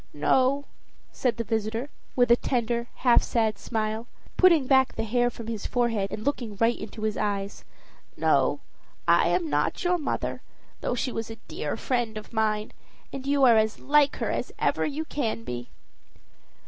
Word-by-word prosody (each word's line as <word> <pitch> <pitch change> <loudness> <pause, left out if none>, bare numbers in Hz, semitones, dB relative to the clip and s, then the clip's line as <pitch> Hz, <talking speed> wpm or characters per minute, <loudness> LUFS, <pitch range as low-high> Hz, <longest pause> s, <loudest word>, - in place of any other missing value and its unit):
"No," 260 - +2 0.5
said 245 -3 -1
the 230 - -1
visitor, 225 +4 -2 0.2
with 245 -1 +3
a - - +9
tender, 235 -1 -1 0.2
half 245 - +7
sad 220 -3 0
smile, 220 0 -2 0.3
putting 340 -7 +5
back 265 0 +3
the - - -2
hair 245 +2 +2
from 235 -1 -9
his 225 -2 -4
forehead, 230 -5 0
and 215 - -5
looking 235 -7 -2
right 230 +1 +3
into 215 +1 -8
his 215 -1 -1
eyes 200 -1 -2 0.5
"no, - - +2 0.5
I - - +5
am 345 -3 +1
not - - 0
your 355 0 +2
mother, 300 - -3 0.4
though - - -1
she 250 +1 -2
was 225 -1 -4
a 225 - -6
dear - - -4
friend 240 -5 -1
of 215 - -9
mine; 215 -1 0 0.4
and 270 0 -6
you 280 -1 +2
are 235 -3 +7
as 220 0 +2
like 290 0 +3
her - - -2
as - - -3
ever - - +1
you 305 +2 -3
can 230 -7 -2
be." 120 - -6
235 Hz, 175 wpm, -26 LUFS, 220-265 Hz, 0.5 s, a